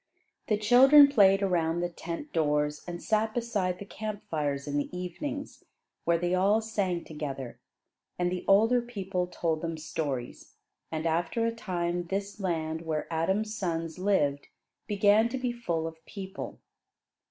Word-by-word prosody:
The 210 - +2
children 270 +7 +8
played 200 -6 +5
around 170 -3 +1
the 175 - +1
tent 170 - -7
doors, 150 -1 +1
and 175 -1 -6
sat 220 0 +1
beside 205 -7 -1
the 200 - -8
camp 215 0 -6
fires 145 -3 -1
in 145 0 -1
the 145 - -1
evenings, 280 - -5 0.4
where 170 0 +3
they 175 +1 -1
all 195 +4 +4
sang 200 -6 -1
together, 140 -5 -6 0.6
and 180 0 0
the 180 - -3
older 225 +5 +5
people 195 -6 -3
told 165 -3 -1
them 165 -1 -3
stories. 145 -5 -5 0.4
And 160 0 -3
after 170 +8 0
a 230 - 0
time 175 -5 -2
this 200 +3 -3
land 160 -4 -2
where 160 -2 -2
Adam's 190 +7 0
sons 165 -3 -3
lived 145 -8 +1 0.4
began 210 +2 +4
to 260 - -3
be 250 -1 -1
full 175 -10 -2
of 160 0 -7
people. 190 -1 -7
180 Hz, 155 wpm, -29 LUFS, 160-215 Hz, 0.6 s, children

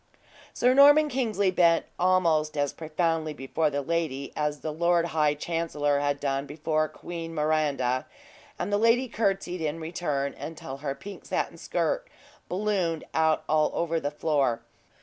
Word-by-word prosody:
Sir 250 +1 +3
Norman 290 +3 +7
Kingsley 220 -8 +1
bent 170 -2 +3
almost 165 -4 +2
as 145 -1 0
profoundly 160 -1 -1
before 150 +3 0
the 145 -1 -2
lady 150 -4 -2
as 150 -1 -2
the 155 - -3
lord 170 +1 +2
high 150 -2 +2
chancellor 150 -3 -1
had 145 0 0
done 140 0 -1
before 155 +1 0
Queen 165 -1 -7
Miranda; 150 -5 0 0.5
and 205 - -3
the 205 - +3
lady 230 +3 +3
courtesied, 195 -6 -1
in 155 +1 -2
return, 155 -4 -2
until 145 -2 -7
her 140 -1 -4
pink 195 +8 -10
satin - - -2
skirt - - -1 0.4
ballooned 185 -4 -1
out 160 -1 +2
all 155 0 +3
over 165 -1 0
the 145 - -2
floor. 140 -6 0
160 Hz, 150 wpm, -27 LUFS, 145-180 Hz, 0.5 s, Norman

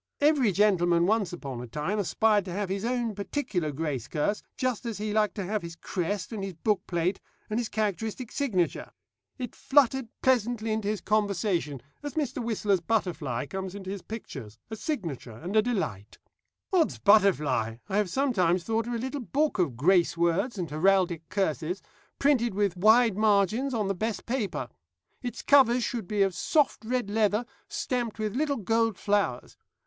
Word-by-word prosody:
Every 285 -7 +4
gentleman 175 -4 +3
once 205 -2 +1
upon 135 -8 -6
a 125 - -7
time 150 - -2
aspired 210 +1 +2
to 185 - -6
have 200 0 -2
his 195 +1 -2
own 240 -2 -1
particular 200 - -2
grace 140 -4 -3
curse, 175 +7 -1 0.2
just 255 -4 -1
as 230 -3 -4
he 210 0 -3
liked 215 -1 +2
to 200 - -3
have 210 +2 -1
his 170 0 -8
crest, 185 +5 -3
and 205 -3 -4
his 195 -2 -5
bookplate, 180 -1 0 0.3
and 215 - +1
his 235 - -2
characteristic 220 +3 -2
signature. 200 - -1 0.4
It 250 -4 -5
fluttered 265 -2 +3 0.2
pleasantly 240 -3 +2
into 215 -1 -1
his 210 -3 -1
conversation, 200 - 0 0.2
as 290 -2 -6
Mr. 270 -5 -1
Whistler's 210 -5 +1
butterfly 165 - -1
comes 190 +3 -5
into 190 -1 -6
his 200 -1 -5
pictures 135 - -8
a - - -3
signature 170 - -4
and 180 - -5
a 215 - +7
delight. 190 - -3 0.6
'Od's 340 -4 +3
butterfly!' 150 - +3
I 195 - -1
have 210 -3 +1
sometimes 185 -9 +1
thought 225 +2 -1
of 240 - -2
a - - 0
little 265 +4 -4
book 285 0 0
of 145 -10 +1
grace 170 +3 +3
words 175 +8 +1
and 180 -3 -2
heraldic 175 0 +2
curses, 180 -1 -1 0.4
printed 240 -7 +2
with 200 -3 +1
wide 220 +2 +5
margins 215 +5 +3
on 220 -5 0
the 195 - +1
best 215 +3 -2
of - - -36
paper. 235 -4 -2 0.5
Its 245 -1 -5
covers 255 -4 +5
should 230 -7 -3
be 205 0 +2
of 195 -1 +1
soft 295 - +1
red 245 -3 -1
leather, 215 +1 +2 0.2
stamped 240 -4 -2
with 215 0 -2
little 285 0 0
gold 225 0 +1
flowers. 200 -12 0
205 Hz, 175 wpm, -28 LUFS, 175-230 Hz, 0.6 s, a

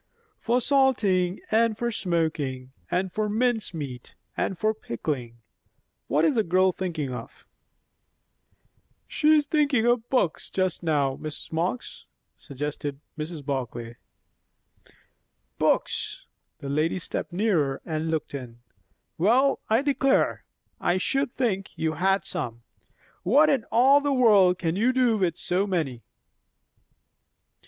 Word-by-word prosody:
"For 240 +2 +1
salting, 220 -10 +2
and 220 0 +3
for 240 +1 -1
smoking, 155 - -2 0.2
and 185 0 -1
for 215 -1 -1
mince 225 +1 0
meat, 140 -7 -7 0.2
and 190 - -2
for 215 +3 +1
pickling. 120 - -5 0.7
What 150 +3 +2
is - - +3
the 230 - +2
girl 185 0 +3
thinking 160 -8 -4
of?" - - -9 1.6
"She 310 0 +3
is 300 -1 +3
thinking 285 -6 +2
of 240 -1 +1
books 220 -11 0
just 185 -2 -1
now, 145 -5 +1
Mrs. 155 -1 -7
Marx," 175 +9 -3 0.3
suggested 145 0 -5 0.2
Mrs. 155 -1 -6
Barclay. 120 -4 -4 1.6
"Books!" - - 0 0.3
The 140 - -7
lady 155 +5 0
stepped 180 - -4
nearer 170 -8 +1
and 160 0 -2
looked 160 -2 -2
in. 125 -4 -7 0.6
"Well, 245 +10 +3
I 225 +5 +3
declare! 275 -1 +1 0.3
I 175 - +1
should 270 +7 0
think 200 -7 -2
you 160 -1 0
had 195 +5 +1
some. 120 -1 -5 0.6
What 290 - +4
in 260 -5 0
all 265 +6 +5
the 285 0 0
world 205 -8 +5
can 165 -2 -1
you 235 +6 +2
do 245 -4 +2
with 175 -4 0
so 190 +3 0
many?" 155 - -2
185 Hz, 125 wpm, -26 LUFS, 150-235 Hz, 1.6 s, all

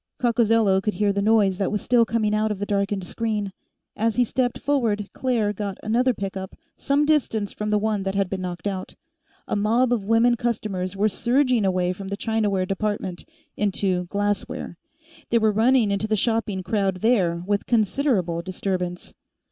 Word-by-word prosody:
Coccozello 225 -5 +3
could 210 +1 -2
hear 205 -1 +1
the 200 - 0
noise 205 -3 +3
that 195 - 0
was 210 - 0
still 235 +1 +3
coming 215 -1 0
out 215 +1 +1
of 210 - -2
the 205 - -3
darkened 200 -1 -1
screen. 210 0 -3 0.4
As 225 +1 0
he 245 - +4
stepped 245 +1 -1
forward, 230 -8 0
Claire 230 -5 0
got 200 -1 -4
another 240 +4 +2
pickup, 195 -3 -5 0.2
some 285 +1 +1
distance 230 -9 +1
from 210 0 -4
the 210 - +3
one 210 -1 0
that 195 0 -3
had 195 -1 +1
been 185 0 -4
knocked 175 -1 -5
out. 190 -2 -4 0.5
A - - -1
mob 230 +5 +2
of 225 -4 -1
women 230 +3 +3
customers 205 -6 -2
were 210 +2 +3
surging 245 +1 +2
away 185 -1 +1
from 195 +1 -8
the 200 +1 -4
Chinaware 210 -4 0
Department, 195 -2 -3 0.3
into 190 -3 0
Glassware; 205 +4 -2 0.5
they 235 - +3
were 220 -1 +3
running 225 0 +3
into 200 +2 0
the 215 - +1
shopping 215 -3 0
crowd 195 -2 -1
there, 180 -8 +2
with 200 +1 -1
considerable 215 - +1
disturbance. 180 -1 -4
210 Hz, 175 wpm, -24 LUFS, 195-230 Hz, 0.5 s, he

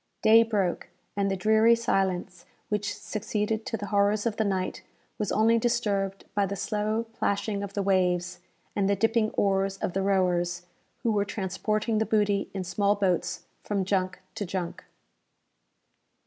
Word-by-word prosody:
Day 220 +1 +8
broke, 205 -6 0 0.3
and 200 -1 +1
the 195 - 0
dreary 220 +4 +5
silence 185 -5 -1 0.2
which 210 -1 -1
succeeded 215 +1 -2
to 225 - -2
the 205 - -5
horrors 205 +1 +3
of 225 -2 0
the 220 - +2
night 190 -3 -2 0.4
was 210 - -1
only 225 +2 +4
disturbed 200 -5 0
by 200 -1 +1
the 200 - -3
slow 215 +3 -1
plashing 200 -1 -1
of 200 -1 -5
the 200 - 0
waves, 180 -2 +1 0.4
and 200 -1 +1
the 200 - +3
dipping 225 +2 +2
oars 195 0 +1
of 180 - -3
the 195 - 0
rowers, 180 -2 +1 0.4
who 230 - +2
were 205 -2 +2
transporting 215 +3 -1
the 220 - 0
booty 205 -2 +1
in 190 -1 -4
small 200 +3 +1
boats 190 -3 0 0.2
from 200 -2 -1
junk 185 -1 0
to - - -4
junk. 185 -2 -4
200 Hz, 160 wpm, -27 LUFS, 190-215 Hz, 0.4 s, Day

